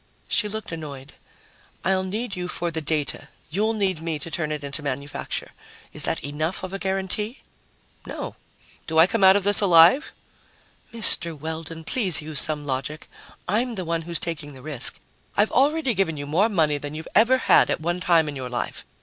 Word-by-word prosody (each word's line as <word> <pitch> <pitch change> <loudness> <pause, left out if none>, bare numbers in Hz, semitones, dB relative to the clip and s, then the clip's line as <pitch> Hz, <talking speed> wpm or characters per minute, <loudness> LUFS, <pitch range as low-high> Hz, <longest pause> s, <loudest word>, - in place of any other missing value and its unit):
She 210 -2 +1
looked 215 -2 -5
annoyed. 150 -4 -8 0.7
"I'll 190 0 +2
need 205 +3 -4
you 180 0 -4
for 175 -1 -3
the 160 0 -3
data. 150 -2 -2 0.2
You'll 215 +6 +1
need 190 -6 -1
me 165 -1 -2
to 165 +3 -8
turn 155 -2 -2
it 150 -1 -4
into 140 +2 -4
manufacture. 140 0 -4 0.4
Is - - +4
that - - -1
enough 155 +7 -3
of 185 0 -6
a 195 - -4
guarantee?" 195 +5 -2 0.7
"No. - - -6 0.5
Do 160 -1 -2
I 160 - +8
come 225 +1 -1
out 190 0 +8
of 200 - +1
this 205 +1 +3
alive?" 180 - +6 0.8
"Mr. 170 -7 +4
Weldon, 160 +1 -6
please 185 - +2
use 155 -2 0
some 150 0 -2
logic. 140 +3 -4 0.4
I'm 230 +5 0
the 185 -3 -4
one 165 0 -1
who's 170 +1 -3
taking 150 -3 -5
the 130 -1 -13
risk. 145 -5 +2 0.4
I've 210 +1 +3
already 280 0 +2
given 190 -6 0
you 145 - -5
more 175 +10 +2
money 155 -7 +1
than 145 +1 -7
you've 160 +1 -7
ever 235 +5 +5
had - - +4
at - - 0
one 175 +3 -2
time 170 -3 +3
in 145 - -5
your 130 -2 -5
life. 120 -1 -4
165 Hz, 190 wpm, -24 LUFS, 150-195 Hz, 0.8 s, I